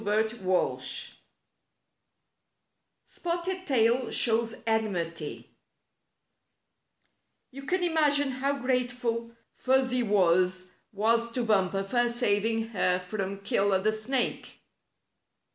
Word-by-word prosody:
STORY 210 +1 +2
IV 195 -5 -1 2.0
ts^OFTED 360 +2 -3
TAIL 245 -2 +2
SHOWS 230 -1 +1
ENMITY 175 -9 -2 2.0
You 275 +1 -9
can 360 +6 -1
imagine 295 -4 +2
how 275 +2 -1
grateful 245 -2 -1 0.2
Fuzzy 255 -1 +1
Wuzz 185 -3 +2 0.2
was 230 +3 +1
to 245 - -1
Bumper 195 -3 +1
for 240 +4 +1
saving 225 -1 0
her 180 -4 +1
from 195 +1 -5
Killer 200 -3 +2
the 215 +3 +1
Snake! 240 +4 -2
230 Hz, 90 wpm, -28 LUFS, 200-255 Hz, 2.0 s, STORY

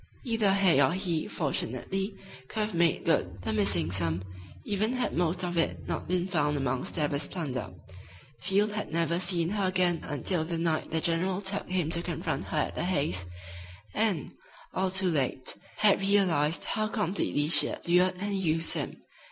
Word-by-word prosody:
Either 225 -5 +1
Hay 190 -7 +4
or 135 +4 +3
he, 175 -4 -1
fortunately, 180 - -2 0.3
could 215 - -3
have 210 -1 -2
made 170 -1 +1
good 95 - 0
the 110 - -2
missing 100 -6 +1
sum, 85 -1 -1 0.4
even 215 +3 -1
had 250 -1 -1
most 175 +1 0
of 175 -1 -3
it 165 - -1
not - - -4
been 180 0 0
found 150 -5 0
amongst 130 -2 -2
Stabber's 145 -2 0
plunder. 140 - -4 0.7
Field 200 +3 +1
had 210 0 -5
never 170 +1 0
seen 175 -2 +1
her 200 0 -1
again 180 -2 +2
until 160 +3 -1
the 165 +1 -3
night 165 -1 -1
the 160 - 0
general 180 +3 0
took 200 0 -3
him 180 -4 -1
to 170 - +2
confront 165 -5 -3
her 155 - -4
at 150 - 0
the - - -3
Hays', 140 - 0 0.7
and, 210 -7 0 0.4
all 190 0 0
too 190 -1 +2
late, 130 -3 -1 0.2
had 210 -2 +3
realized 180 -6 +2
how 215 0 -1
completely 195 -8 -1
she 165 - +9
had - - -7
lured 180 +2 +3
and 200 +2 -3
used 165 -1 +3
him. - - -5
170 Hz, 175 wpm, -28 LUFS, 150-190 Hz, 0.7 s, she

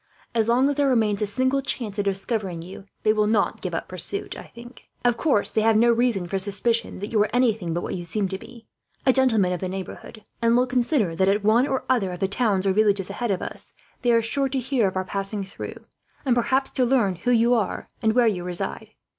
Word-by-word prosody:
As 225 -2 +1
long 250 +3 +3
as 285 0 -1
there 285 -1 +3
remains 215 -5 +2
a 210 - +1
single 260 +6 0
chance 225 -6 -4
of 205 - 0
discovering 195 -3 -2
you, 190 +2 -10 0.2
they 215 - +4
will 210 -1 +2
not 210 -1 +1
give 180 -3 -3
up - - -4
pursuit. 185 +2 -1 0.7
Of 240 -1 +4
course, 235 -5 +1
they 220 - +1
have 220 0 +4
no 235 +2 +5
reason 235 -5 +1
for 195 +2 -2
suspicion 205 +4 -1
that 205 +3 -6
you 215 -2 +3
are 210 - +2
anything 225 -8 +1
but 175 - -1
what - - -4
you 175 - -4
seem 195 +4 -1
to 190 0 -4
be, 235 +1 -13 0.4
a 260 - +5
gentleman 225 -9 +3
of 180 - -3
the 185 - -3
neighbourhood; 195 +3 -8 0.2
and 230 +1 +4
will 250 - +3
consider 245 - +1
that, 190 +3 +2
at 205 +1 +1
one 230 +6 +4
or 265 -2 -1
other 230 -8 +1
of 180 - -7
the 195 - +1
towns 200 -2 0
or 195 - +3
villages 200 -2 +2
ahead 240 +3 -3
of 190 -3 -1
us, - - -7 0.3
they 245 - +2
are 230 -1 +3
sure 270 +4 +1
to 270 - -2
hear 255 -4 +1
of 185 - -4
our 185 - -1
passing 195 +1 -3
through, 195 - -8 0.5
and 250 -3 +3
perhaps 265 +3 +1
to 255 - +1
learn 235 -8 +2
who 210 - -2
you 240 0 +4
are 220 -5 -1
and 220 -1 +2
where 245 0 +4
you 195 -6 0
reside. 170 - -4
215 Hz, 240 wpm, -24 LUFS, 195-245 Hz, 0.7 s, no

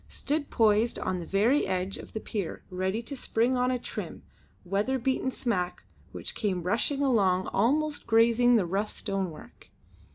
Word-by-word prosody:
stood 290 +1 -2
poised 220 +1 +3
on 185 -1 -2
the 170 - -7
very 225 +9 +2
edge 185 +1 -1
of - - -9
the 220 - -3
pier 205 -5 -4
ready 190 +5 -1
to 280 +5 -6
spring 245 0 +1
on 250 0 +2
a 255 - +1
trim, 245 - -6 0.4
weather 205 +8 0
beaten 260 +1 0
smack 195 -9 -2 0.3
which - - -6
came 190 -5 -1
rushing 235 - 0
along 195 -8 +3
almost 290 +8 +1
grazing 235 +2 +5
the 210 -5 +3
rough 195 +5 -1
stone 195 -3 -2
work. 155 - -14
220 Hz, 165 wpm, -28 LUFS, 190-250 Hz, 0.4 s, grazing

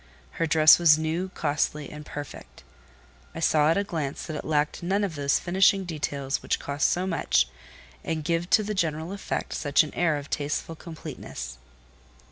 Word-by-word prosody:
Her 165 - +3
dress 155 +1 +7
was 160 -3 +6
new, 160 +4 -2
costly, 150 -1 -1
and 150 0 -8
perfect. 140 - -9 0.7
I - - -5
saw 155 -2 +3
at 165 - +3
a 200 - +2
glance 155 -8 -4
that 155 - -5
it 150 - -5
lacked 150 -1 0
none 195 +4 0
of 195 -5 -2
those 140 -2 +1
finishing 190 +2 +3
details 145 -4 -3
which - - 0
cost 140 0 0
so 180 +1 0
much, 160 - +1 0.6
and 160 -2 -2
give 170 +2 -1
to 215 - +4
the 210 +1 -3
general 160 -2 -1
effect 200 - -4
such 145 0 +3
an 155 - -8
air 160 -4 +1
of 140 -1 -7
tasteful 150 +3 -3
completeness. 155 - -8
155 Hz, 175 wpm, -26 LUFS, 145-175 Hz, 0.7 s, dress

